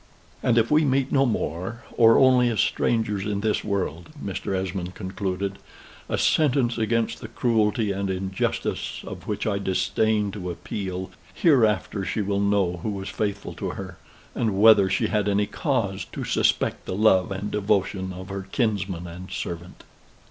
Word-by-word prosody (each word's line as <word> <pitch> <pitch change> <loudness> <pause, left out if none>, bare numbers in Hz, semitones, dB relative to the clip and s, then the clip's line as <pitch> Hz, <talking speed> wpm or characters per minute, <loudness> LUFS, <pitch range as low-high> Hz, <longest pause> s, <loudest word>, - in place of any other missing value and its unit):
"And 120 -1 +2
if 115 +3 +3
we 155 +1 +5
meet 135 -2 +1
no 135 -1 +4
more, 105 +1 -3
or 115 -1 +6
only 130 -2 +5
as 115 - -1
strangers 110 -4 +1
in 100 -1 -2
this 105 0 0
world," 90 -5 -2
Mr. 95 -2 -3
Esmond 95 -1 -3
concluded, 95 0 -3 0.5
"a - - 0
sentence 130 -6 +2
against 115 +1 0
the - - -6
cruelty 110 -2 +1
and 100 0 -2
injustice 95 0 -2
of - - -8
which - - -2
I 100 -2 0
disdain 105 +2 +1
to 90 -3 -5
appeal; 95 +1 -5 0.2
hereafter 110 - +2
she 95 +4 -1
will 100 0 0
know 100 -3 +1
who 85 - -4
was 95 -2 -4
faithful 100 -2 -3
to - - -4
her, 95 -2 -8 0.3
and 110 -5 0
whether 105 -3 +7
she 95 - +1
had 105 -1 +1
any 100 +1 +2
cause 115 - -1
to - - -4
suspect - - +1
the - - -2
love 95 -3 +4
and 100 +2 -4
devotion 100 -2 0
of 95 +1 -8
her 95 -1 -5
kinsman 100 -7 -1
and 90 +2 -9
servant." 85 +1 -6
100 Hz, 160 wpm, -25 LUFS, 95-110 Hz, 0.5 s, whether